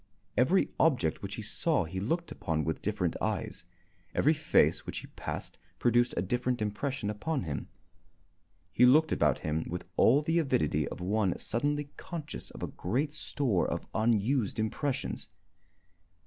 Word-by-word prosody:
Every 160 Hz, +10 st, +3 dB
object 125 Hz, -, +2 dB
which 100 Hz, 0 st, -5 dB
he 110 Hz, -, -6 dB
saw 145 Hz, -, +1 dB
he 90 Hz, +3 st, -5 dB
looked 165 Hz, -, -1 dB
upon 80 Hz, -1 st, -1 dB
with 80 Hz, 0 st, -2 dB
different -, -, -1 dB
eyes. -, -, -2 dB, 0.5 s
Every 155 Hz, -, +4 dB
face 155 Hz, 0 st, +3 dB
which -, -, -5 dB
he -, -, -5 dB
passed -, -, -6 dB, 0.2 s
produced 120 Hz, 0 st, +3 dB
a 85 Hz, -, +1 dB
different 125 Hz, +5 st, 0 dB
impression 105 Hz, +2 st, -2 dB
upon 135 Hz, +7 st, -2 dB
him. 75 Hz, -4 st, -4 dB, 1.0 s
He 125 Hz, -, +3 dB
looked 155 Hz, +6 st, +6 dB
about 75 Hz, -4 st, +2 dB
him 80 Hz, +1 st, 0 dB
with 90 Hz, +1 st, -4 dB
all 140 Hz, +6 st, +5 dB
the 165 Hz, +3 st, +2 dB
avidity 75 Hz, -, +1 dB
of -, -, -7 dB
one 100 Hz, 0 st, +1 dB
suddenly 145 Hz, +4 st, -1 dB
conscious 165 Hz, -4 st, -6 dB
of -, -, -9 dB
a -, -, -1 dB
great 135 Hz, -, -2 dB
store 125 Hz, -, 0 dB
of -, -, -3 dB
unused 110 Hz, +1 st, +1 dB
impressions. 125 Hz, +5 st, -2 dB
120 Hz, 150 wpm, -30 LUFS, 95-145 Hz, 1.0 s, looked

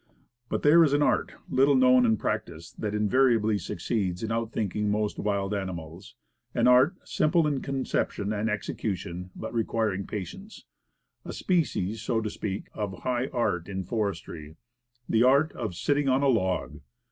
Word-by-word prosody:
But -, -, -2 dB
there 165 Hz, +3 st, +7 dB
is 145 Hz, -3 st, +2 dB
an 145 Hz, 0 st, +3 dB
art, -, -, +1 dB
little 135 Hz, +2 st, +3 dB
known 125 Hz, -1 st, +5 dB
and 110 Hz, -1 st, +3 dB
practiced, 80 Hz, -4 st, -4 dB
that 105 Hz, -1 st, -2 dB
invariably 110 Hz, -1 st, +3 dB
succeeds 95 Hz, -6 st, -2 dB
in 110 Hz, -, -2 dB
outflanking 110 Hz, -2 st, -1 dB
most 105 Hz, 0 st, -1 dB
wild 100 Hz, -1 st, -1 dB
ani 95 Hz, -2 st, -2 dB
mals; 85 Hz, +3 st, -10 dB, 0.4 s
an -, -, +3 dB
art, 130 Hz, +8 st, +5 dB
simple 165 Hz, +1 st, +2 dB
in 145 Hz, -3 st, 0 dB
conception 130 Hz, -6 st, -2 dB
and 110 Hz, +1 st, -1 dB
execution, 95 Hz, -4 st, -4 dB
but 110 Hz, -, -6 dB
requiring 110 Hz, -4 st, -1 dB
patience; 195 Hz, -, -7 dB, 0.6 s
a -, -, -7 dB
species, 115 Hz, -, 0 dB
so 115 Hz, 0 st, 0 dB
to 110 Hz, -2 st, -3 dB
speak, 100 Hz, -1 st, -5 dB
of 100 Hz, -3 st, -5 dB
high 125 Hz, 0 st, 0 dB
art 90 Hz, -10 st, -1 dB
in 95 Hz, -1 st, -3 dB
forestry 90 Hz, -7 st, -4 dB, 0.5 s
the 110 Hz, -, +2 dB
art 140 Hz, +5 st, +4 dB
of 110 Hz, -7 st, -5 dB
"sitting 145 Hz, +7 st, +1 dB
on 130 Hz, +2 st, +2 dB
a 140 Hz, -, +4 dB
log." 95 Hz, -7 st, 0 dB
110 Hz, 160 wpm, -27 LUFS, 100-130 Hz, 0.6 s, there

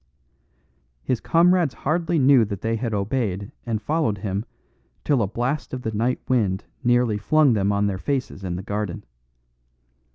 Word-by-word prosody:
His 125 Hz, -, 0 dB
comrades 170 Hz, -3 st, +3 dB
hardly 165 Hz, +3 st, 0 dB
knew 135 Hz, -3 st, +6 dB
that 100 Hz, -2 st, -6 dB
they 115 Hz, 0 st, 0 dB
had 115 Hz, 0 st, -2 dB
obeyed 100 Hz, -1 st, -2 dB, 0.2 s
and 110 Hz, -2 st, -1 dB
followed 145 Hz, -2 st, 0 dB
him 100 Hz, +2 st, -3 dB, 0.6 s
till 140 Hz, -5 st, +2 dB
a 100 Hz, -, +1 dB
blast 125 Hz, +7 st, -2 dB
of 125 Hz, -, -7 dB
the 110 Hz, -, -2 dB
night 115 Hz, +4 st, 0 dB
wind 105 Hz, -7 st, +1 dB, 0.2 s
nearly 120 Hz, -3 st, +2 dB
flung 150 Hz, +4 st, +4 dB
them 100 Hz, -2 st, +1 dB
on 100 Hz, 0 st, +1 dB
their 95 Hz, -2 st, -1 dB
faces 130 Hz, -7 st, -3 dB
in 90 Hz, -2 st, -3 dB
the 90 Hz, -, -5 dB
garden. 100 Hz, -3 st, -3 dB
115 Hz, 160 wpm, -23 LUFS, 100-135 Hz, 0.6 s, knew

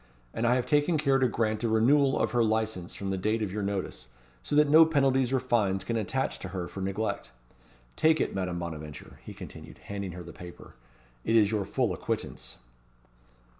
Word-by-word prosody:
And 120 Hz, -, 0 dB
I 120 Hz, -, +4 dB
have 125 Hz, -, 0 dB
taken 150 Hz, +2 st, +2 dB
care 140 Hz, -3 st, +2 dB
to 130 Hz, -, +3 dB
grant 110 Hz, -1 st, -1 dB
a 115 Hz, -, +1 dB
renewal 135 Hz, +5 st, +4 dB
of -, -, 0 dB
her 120 Hz, -1 st, +3 dB
licence 110 Hz, -5 st, -1 dB
from 100 Hz, -1 st, -4 dB
the 95 Hz, -, -2 dB
date 110 Hz, +3 st, 0 dB
of 100 Hz, -, -3 dB
your 105 Hz, +2 st, -3 dB
notice; 100 Hz, -9 st, -3 dB, 0.3 s
so 145 Hz, -, -2 dB
that 150 Hz, 0 st, +5 dB
no 155 Hz, +3 st, +8 dB
penalties 135 Hz, -5 st, +2 dB
or 135 Hz, -, +2 dB
fines 105 Hz, -7 st, +1 dB
can 115 Hz, +4 st, -2 dB
attach 125 Hz, +5 st, -1 dB
to -, -, -6 dB
her 90 Hz, -2 st, -4 dB
for 95 Hz, -, -7 dB
neglect. 100 Hz, +3 st, -2 dB, 0.7 s
Take 160 Hz, 0 st, +3 dB
it, -, -, 0 dB
Madame 90 Hz, -2 st, -2 dB
Bonaventure," 75 Hz, -4 st, -7 dB
he -, -, -9 dB
continued, -, -, -10 dB
handing 100 Hz, -3 st, -6 dB
her 90 Hz, 0 st, -8 dB
the 85 Hz, -, -11 dB
paper. 90 Hz, -1 st, -11 dB, 0.5 s
"It 115 Hz, -, +1 dB
is 105 Hz, -2 st, +5 dB
your 105 Hz, -3 st, 0 dB
full 100 Hz, -, 0 dB
acquittance." -, -, -4 dB
110 Hz, 200 wpm, -28 LUFS, 95-130 Hz, 0.7 s, no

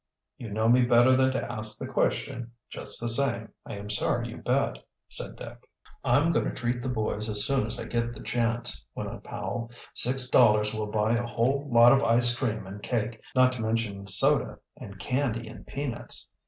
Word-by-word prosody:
"You 115 Hz, -, -8 dB
know 110 Hz, +2 st, -1 dB
me 125 Hz, +2 st, +5 dB
better 120 Hz, +1 st, +5 dB
than 130 Hz, 0 st, +3 dB
to 130 Hz, -, -3 dB
ask 110 Hz, 0 st, -3 dB
the -, -, -6 dB
question. 120 Hz, 0 st, -2 dB, 0.2 s
Just -, -, 0 dB
the 120 Hz, -, -2 dB
same, 120 Hz, -2 st, +1 dB
I -, -, -6 dB
am 100 Hz, 0 st, -8 dB
sorry 120 Hz, +3 st, 0 dB
you 115 Hz, -, -9 dB
bet," 135 Hz, +3 st, -1 dB, 0.3 s
said -, -, -1 dB
Dick. -, -, -12 dB, 0.3 s
"I'm 145 Hz, +7 st, +2 dB
going 160 Hz, -, 0 dB
to -, -, -4 dB
treat 120 Hz, 0 st, -2 dB
the 130 Hz, -, -4 dB
boys 110 Hz, -2 st, -1 dB
as 105 Hz, -1 st, +2 dB
soon 135 Hz, -6 st, 0 dB
as 110 Hz, -, -3 dB
I -, -, -5 dB
get 115 Hz, 0 st, -2 dB
the -, -, -11 dB
chance," 120 Hz, 0 st, -1 dB
went -, -, -5 dB
on -, -, -9 dB
Powell. 115 Hz, -1 st, -5 dB, 0.2 s
"Six 125 Hz, +1 st, +5 dB
dollars 105 Hz, -4 st, +4 dB
will 110 Hz, -1 st, -3 dB
buy 105 Hz, +1 st, 0 dB
a 120 Hz, 0 st, -1 dB
whole 135 Hz, +5 st, -1 dB
lot 120 Hz, +1 st, +7 dB
of 135 Hz, -, +4 dB
ice 120 Hz, +1 st, +3 dB
cream 110 Hz, -5 st, -3 dB
and 100 Hz, +2 st, -9 dB
cake, 110 Hz, -1 st, -3 dB
not 130 Hz, 0 st, +5 dB
to 125 Hz, -2 st, -6 dB
mention 110 Hz, -3 st, -3 dB
soda -, -, +3 dB, 0.2 s
and 100 Hz, 0 st, -11 dB
candy 120 Hz, +2 st, -2 dB
and -, -, -12 dB
peanuts." 135 Hz, -4 st, -4 dB
120 Hz, 200 wpm, -27 LUFS, 110-125 Hz, 0.3 s, lot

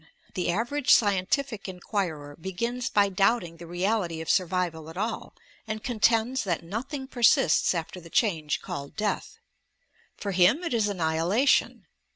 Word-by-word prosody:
The 180 Hz, -2 st, -1 dB
average 240 Hz, +9 st, -1 dB
scientific 205 Hz, +3 st, +2 dB
inquirer 175 Hz, -6 st, -4 dB
begins 235 Hz, +9 st, -3 dB
by 200 Hz, -1 st, +3 dB
doubting 195 Hz, -3 st, +1 dB
the 170 Hz, 0 st, -10 dB
reality 175 Hz, -1 st, -1 dB
of 160 Hz, -, -1 dB
survival 175 Hz, -3 st, -1 dB
at 165 Hz, -, -10 dB
all, 220 Hz, +3 st, -3 dB, 0.3 s
and 215 Hz, 0 st, -4 dB
contends 235 Hz, +1 st, +1 dB
that 175 Hz, -5 st, -2 dB
nothing 260 Hz, -, -5 dB
persists 235 Hz, -, +3 dB
after 170 Hz, +2 st, -5 dB
the 165 Hz, -, -13 dB
change 160 Hz, -8 st, 0 dB
called 140 Hz, 0 st, -6 dB
death. 215 Hz, -1 st, -2 dB, 0.8 s
For 200 Hz, -, -4 dB
him 190 Hz, -, +4 dB
it 340 Hz, -, -2 dB
is 220 Hz, -3 st, +2 dB
annihilation! 180 Hz, -, +1 dB
195 Hz, 140 wpm, -27 LUFS, 170-230 Hz, 0.8 s, him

